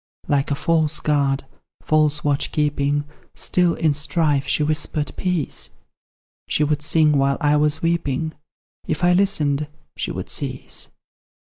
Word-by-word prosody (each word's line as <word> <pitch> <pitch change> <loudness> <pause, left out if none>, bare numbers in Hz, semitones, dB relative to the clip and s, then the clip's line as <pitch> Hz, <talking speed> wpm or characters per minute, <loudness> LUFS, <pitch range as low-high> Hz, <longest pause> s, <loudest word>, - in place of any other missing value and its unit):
Like 140 -1 +1
a 140 - +1
false 155 0 +1
guard, 140 -2 +1 0.4
false 150 -1 +2
watch 145 -1 0
keeping, 145 -1 0 0.3
Still, 180 -2 +2
in 160 -3 +2
strife, 145 -1 0
she 150 - +2
whispered 150 0 -1
peace; 180 -6 -1 0.8
She 150 - +1
would 150 0 0
sing 150 -1 +3
while 135 0 +2
I 150 -2 +3
was 150 +1 +1
weeping; 160 -2 -1 0.5
If 155 +2 -2
I 175 0 +5
listened, 150 -7 +2 0.3
she - - -3
would - - -6
cease. - - -4
150 Hz, 135 wpm, -21 LUFS, 145-160 Hz, 0.8 s, I